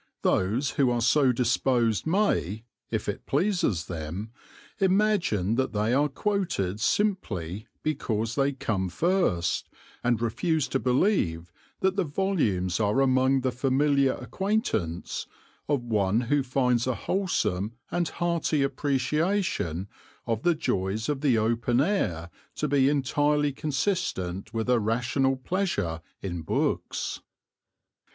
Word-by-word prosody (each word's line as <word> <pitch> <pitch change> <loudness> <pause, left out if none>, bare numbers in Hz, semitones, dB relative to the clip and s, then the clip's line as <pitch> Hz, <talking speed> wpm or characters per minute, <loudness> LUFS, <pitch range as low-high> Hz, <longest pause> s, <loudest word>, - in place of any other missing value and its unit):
Those 115 +9 +1
who 135 -1 +2
are 120 -1 +1
so 130 +3 +4
disposed 125 -1 +1
may, 160 - +1 0.3
if - - -2
it - - -4
pleases 160 - +1
them, 85 +6 -5 0.5
imagine 190 - +2
that 130 - 0
they 105 +3 +1
are 145 +3 +3
quoted 155 - -1
simply 105 - -1 0.2
because 115 -7 -1
they 140 +2 +2
come 100 -8 -2
first, 125 - 0 0.3
and 120 -2 +2
refuse 150 +7 0
to 135 - 0
believe 125 - +1 0.3
that 190 +1 +1
the 195 - +3
volumes 140 - 0
are 105 +4 +2
among 130 0 +3
the 130 0 0
familiar 135 +2 +2
acquaintance 190 - -2 0.4
of 140 -4 +1
one 105 -2 +1
who 140 +4 +1
finds 125 -2 +1
a 130 - +1
wholesome 110 - -1 0.2
and 175 -2 0
hearty 170 -4 0
appreciation 140 - 0 0.4
of 115 -1 -1
the 175 -1 +3
joys 110 - -1
of 145 -2 -1
the 135 -6 +3
open 115 +2 +1
air 90 - 0 0.2
to 150 - -1
be 140 -1 +3
entirely 145 +1 +1
consistent 135 - -2
with 115 -1 -2
a 125 -1 +4
rational 125 +5 +1
pleasure 130 - -2 0.2
in 90 -3 -3
books. 80 - -2
130 Hz, 125 wpm, -27 LUFS, 105-150 Hz, 0.5 s, so